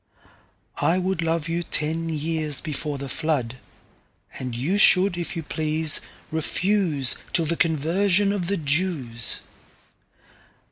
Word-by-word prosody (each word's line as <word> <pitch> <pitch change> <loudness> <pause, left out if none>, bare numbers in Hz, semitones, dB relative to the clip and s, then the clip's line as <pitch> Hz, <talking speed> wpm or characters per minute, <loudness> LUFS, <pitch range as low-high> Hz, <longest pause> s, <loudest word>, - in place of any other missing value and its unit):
I 170 - +2
wouldLove 170 -4 -2
you 170 +1 -2
ten 165 0 -2
years 155 -1 -2
before 150 -2 -4
the 140 0 -7
Flood:And 130 -3 -6
you 170 +12 -1
should 190 -1 +6
if 175 -1 -5
you 165 - -4
please 155 0 +3 0.3
refuseTill 165 -2 +1
the 170 - 0
Conversion 175 +6 +1
of 185 -4 -3
the 200 +1 -1
Jews. 145 -7 +1
160 Hz, 105 wpm, -23 LUFS, 150-175 Hz, 0.3 s, should